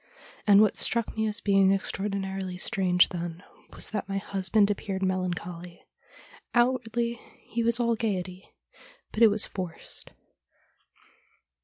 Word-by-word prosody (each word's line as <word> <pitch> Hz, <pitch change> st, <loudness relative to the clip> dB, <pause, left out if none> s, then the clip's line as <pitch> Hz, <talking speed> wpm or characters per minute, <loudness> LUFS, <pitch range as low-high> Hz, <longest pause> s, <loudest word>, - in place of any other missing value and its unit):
And 205 Hz, 0 st, +8 dB
what 215 Hz, -, +3 dB
struck 235 Hz, -2 st, 0 dB
me 220 Hz, 0 st, 0 dB
as 210 Hz, 0 st, -3 dB
being 195 Hz, -1 st, +4 dB
ex 195 Hz, -1 st, 0 dB
traordinarily 195 Hz, -2 st, -3 dB
strange 185 Hz, -4 st, +3 dB
then 175 Hz, 0 st, -5 dB, 0.3 s
was -, -, 0 dB
that 205 Hz, -2 st, -3 dB
my 195 Hz, -, -1 dB
husband 200 Hz, +1 st, +1 dB
appeared 195 Hz, -1 st, -3 dB
melancholy. 180 Hz, -2 st, -3 dB, 0.7 s
Outwardly 235 Hz, -1 st, +1 dB, 0.2 s
he 235 Hz, -, -3 dB
was 235 Hz, +1 st, +3 dB
all 235 Hz, -1 st, +2 dB
gaiety, 190 Hz, -4 st, -3 dB, 0.6 s
but 215 Hz, -, -4 dB
it 225 Hz, -, +9 dB
was 210 Hz, +1 st, +2 dB
forced. 180 Hz, -4 st, -7 dB
195 Hz, 130 wpm, -27 LUFS, 185-220 Hz, 0.7 s, it